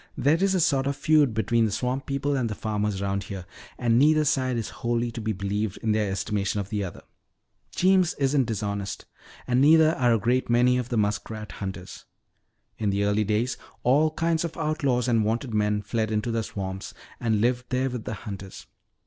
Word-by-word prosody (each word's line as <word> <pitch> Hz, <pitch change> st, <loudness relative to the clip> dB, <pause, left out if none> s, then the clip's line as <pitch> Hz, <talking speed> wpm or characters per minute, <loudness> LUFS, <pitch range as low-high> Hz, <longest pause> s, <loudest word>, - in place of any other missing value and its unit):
"There 160 Hz, +6 st, +2 dB
is 195 Hz, -1 st, +2 dB
a -, -, +2 dB
sort 140 Hz, -5 st, +2 dB
of 140 Hz, -, -1 dB
feud 145 Hz, -5 st, +3 dB
between 115 Hz, +1 st, +2 dB
the 110 Hz, -, -1 dB
swamp 125 Hz, +5 st, -2 dB
people 140 Hz, +1 st, -1 dB
and 125 Hz, -4 st, 0 dB
the 105 Hz, -, -4 dB
farmers 105 Hz, -2 st, -2 dB
around 100 Hz, 0 st, -2 dB
here. 95 Hz, -2 st, -7 dB, 0.3 s
And 120 Hz, -1 st, +2 dB
neither 155 Hz, +2 st, +4 dB
side 130 Hz, -4 st, +1 dB
is 115 Hz, -, -3 dB
wholly 120 Hz, 0 st, 0 dB
to 115 Hz, -, -6 dB
be 110 Hz, 0 st, -1 dB
believed 100 Hz, +1 st, -2 dB
in 110 Hz, -, +1 dB
their 105 Hz, -1 st, +1 dB
estimation 100 Hz, +1 st, -1 dB
of 100 Hz, -1 st, -4 dB
the 105 Hz, -1 st, -2 dB
other. 90 Hz, -, -7 dB, 0.7 s
Jeems 185 Hz, -1 st, +3 dB
isn't 135 Hz, -1 st, +2 dB
dishonest, 100 Hz, -3 st, -3 dB, 0.4 s
and 125 Hz, +1 st, +2 dB
neither 160 Hz, +2 st, +6 dB
are 125 Hz, -6 st, +2 dB
a -, -, +2 dB
great 120 Hz, +5 st, 0 dB
many 125 Hz, +1 st, +4 dB
of 125 Hz, -1 st, -4 dB
the 120 Hz, -, -1 dB
muskrat 105 Hz, +1 st, -2 dB
hunters. 95 Hz, -1 st, -7 dB, 0.7 s
In 105 Hz, -2 st, 0 dB
the 100 Hz, +1 st, 0 dB
early 105 Hz, +1 st, +2 dB
days 110 Hz, +4 st, 0 dB, 0.3 s
all 145 Hz, +5 st, +4 dB
kinds 165 Hz, +1 st, 0 dB
of 165 Hz, -2 st, -5 dB
outlaws 140 Hz, -5 st, 0 dB
and 115 Hz, -3 st, +3 dB
wanted 115 Hz, +3 st, -1 dB
men 105 Hz, -1 st, +1 dB
fled 110 Hz, +1 st, -1 dB
into 110 Hz, +2 st, -1 dB
the 115 Hz, 0 st, 0 dB
swamps 95 Hz, -2 st, -6 dB, 0.2 s
and 110 Hz, -3 st, +1 dB
lived 125 Hz, +3 st, +1 dB
there 130 Hz, +1 st, 0 dB
with 120 Hz, -3 st, -5 dB
the 110 Hz, -, -3 dB
hunters. 100 Hz, -3 st, -8 dB
115 Hz, 200 wpm, -26 LUFS, 105-135 Hz, 0.7 s, neither